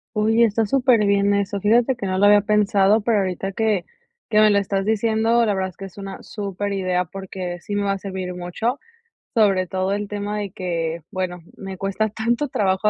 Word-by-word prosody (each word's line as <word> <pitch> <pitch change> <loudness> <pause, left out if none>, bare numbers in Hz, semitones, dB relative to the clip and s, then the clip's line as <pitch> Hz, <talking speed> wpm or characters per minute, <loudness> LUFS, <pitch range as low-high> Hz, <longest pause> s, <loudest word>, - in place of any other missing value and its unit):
Oye, 220 +2 +4
está 220 0 0
superbién 205 -5 +3
eso, 200 0 -1
fíjate 235 +6 +3
que 230 - -5
no 185 -1 -1
lo 205 - +6
había 205 0 +6
pensado, 205 0 +3
pero 220 +1 +1
ahorita 190 0 -2
que 215 -3 0 0.5
que 215 -2 +3
me 215 0 +6
lo 205 - +3
estás 195 0 -1
diciendo, 225 +2 +2
la 210 - +1
verdad 190 0 -1
es 185 - -18
que 195 - -7
es 195 - -13
una 195 -1 -7
superidea, 195 -3 -2
porque 185 -1 -6
sí 205 - -5
me 205 - 0
va 200 0 +1
a - - -3
servir 185 -2 -5
mucho, 200 +9 -3 0.6
sobre 195 -5 +3
todo 190 +2 -1
el 205 0 -3
tema 205 +1 -4
de 205 -1 -3
que, 170 -2 -3
bueno, 180 -2 -3 0.2
me 195 -1 -7
cuesta 195 +2 -1
tanto 235 +6 -1
trabajo, 195 -4 0
200 Hz, 200 wpm, -22 LUFS, 190-215 Hz, 0.6 s, lo